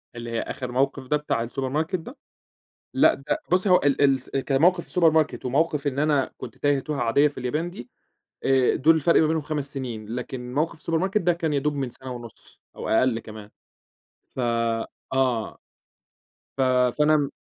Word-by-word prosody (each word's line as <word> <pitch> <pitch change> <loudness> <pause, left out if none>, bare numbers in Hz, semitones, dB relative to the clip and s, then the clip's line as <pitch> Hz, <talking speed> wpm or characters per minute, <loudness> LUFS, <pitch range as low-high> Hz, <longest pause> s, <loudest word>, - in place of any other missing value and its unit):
اللي 120 0 -6
هي 115 - -1
آخر 125 -1 -5
موقف 135 +1 0
ده 150 - +2
بتاع 120 -6 -2
الSupermarket 145 +8 -2
ده؟ 215 - -11 0.8
لأ - - +5
ده 135 - -3
بُصّي 185 +2 +3
هو 180 -1 +6
ال 145 0 +2
الس 135 -2 +2
كموقف 155 +6 +2
الSupermarket 160 -5 +2
وموقف 150 +2 0
إن 140 -1 -1
أنا 145 -3 +1
كنت - - -9
تايّه 145 -1 +2
توهة 150 0 -4
عاديّة 140 +6 +3
في 145 - -11
اليابان 150 +8 -2
دي 120 -8 -10 0.5
آآ، 130 -2 +3
دول 160 +4 +4
الفرق 160 +2 +4
ما 155 - +3
بينهم 160 0 0
5 145 -1 -4
سنين 120 -5 -5
لكن 125 0 -6
موقف 160 +3 -1
الSupermarket 185 +6 0
ده 175 0 +3
كان 165 -3 -2
يا 140 - +2
دوب 150 +1 -1
من 135 -3 -2
سنة 130 +2 -9
ونُص 120 -2 -12
أو - - -6
أقل 115 0 +2
كمان 110 -1 -11 0.9
ف - - -2 0.7
آه. 125 -4 0 1.0
ف - - 0
فأنا 135 +3 +3
140 Hz, 170 wpm, -24 LUFS, 125-155 Hz, 1.0 s, هو